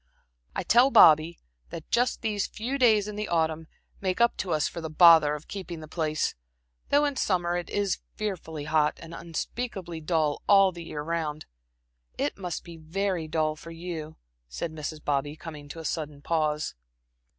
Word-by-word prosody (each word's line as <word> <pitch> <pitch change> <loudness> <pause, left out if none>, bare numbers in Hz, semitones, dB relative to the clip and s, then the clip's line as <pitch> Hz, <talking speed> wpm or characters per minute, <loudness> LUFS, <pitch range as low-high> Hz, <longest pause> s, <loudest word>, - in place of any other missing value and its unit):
"I - - -1
tell 245 +4 +5
Bobby 160 - +6 0.3
that 160 - -9
just 245 +1 +1
these 210 -3 0
few 250 +6 -4
days 215 -5 +4
in 210 -1 -6
the 210 0 -2
autumn 160 -1 0 0.3
make 185 +1 -1
up 235 0 +4
to 185 - -3
us 155 - +2
for 170 - -6
the 160 - -5
bother 155 -2 +7
of 150 - -10
keeping 180 -4 -6
the 155 - -9
place, 155 -1 -1 0.6
though 290 +1 +4
in 285 -1 -1
summer 175 -6 +1
it 175 -1 -3
is 200 -2 0 0.2
fearfully 170 -7 -4
hot, 150 0 +1
and 165 0 -10
unspeakably 170 +1 -5
dull 155 -2 0
all 195 -1 +6
the 170 -1 -9
year 150 -2 -5
round. 155 -2 -3 0.7
It - - -1
must 180 -4 -5
be 170 -1 -10
very 170 +1 -2
dull 155 -1 0
for 165 +2 -11
you," 165 -2 -6 0.3
said 160 - -4
Mrs. 155 0 -6
Bobby, 145 +1 0
coming 155 -3 -9
to 155 - -8
a 160 - -8
sudden 150 -2 -4
pause. 155 -1 0
165 Hz, 175 wpm, -27 LUFS, 155-195 Hz, 0.7 s, bother